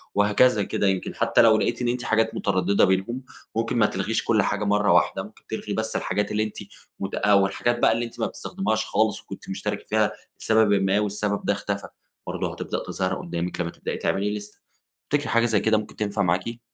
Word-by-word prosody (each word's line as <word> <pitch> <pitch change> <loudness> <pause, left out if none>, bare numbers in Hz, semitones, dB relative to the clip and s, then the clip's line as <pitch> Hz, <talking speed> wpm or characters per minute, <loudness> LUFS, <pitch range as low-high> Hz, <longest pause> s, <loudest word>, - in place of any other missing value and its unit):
وهكذا 105 +2 +4
كده. 100 - 0
يمكن 95 -1 -1
حتى 115 0 +3
لو 110 -2 +6
لقيتي 120 +2 -1
إن 120 - +1
أنتِ 125 0 -2
حاجات 110 0 +1
مترددة 100 0 +2
بينهم، 95 +7 0 0.3
ممكن 115 +1 0
ما 110 - +5
تلغيش 110 +3 -1
كل 110 -2 +3
حاجة 105 - -1
مرّة 105 +1 +3
واحدة - - +2
ممكن - - -14
تلغي - - -4
بس - - -2
الحاجات 105 - -1
اللي 105 +1 +1
أنتِ 110 - -5 0.4
مت 95 0 -3
آآ، 105 - +3
والحاجات 100 +5 +2
بقى - - +5
اللي 115 +1 0
أنتِ 115 - -11
ما - - +1
بتستخدميهاش 110 +2 -2
خالص، 110 -1 +1
وكنتِ - - -10
مشتركة 105 +1 -3
فيها 110 0 +2 0.3
لسببٍ 110 -2 +4
ما 95 +2 +2
والسبب 105 0 -1
ده - - +3
اختفى، 100 0 -4 0.4
برضه - - -3
هتبدأ - - -4
تظهر 95 0 -1
قدّامِك 85 0 -4
لما 85 - -2
تبدئي - - -5
تعملي 100 +2 0
لِيسْتَة. 105 0 -8 0.5
تفتكري 145 0 0
حاجة 115 0 +3
زي 110 -3 +2
كده 110 +1 +3
ممكن 110 - -6
تنفع 105 -1 -1
معاكِ؟ 95 +6 0
105 Hz, 200 wpm, -24 LUFS, 100-115 Hz, 0.5 s, لو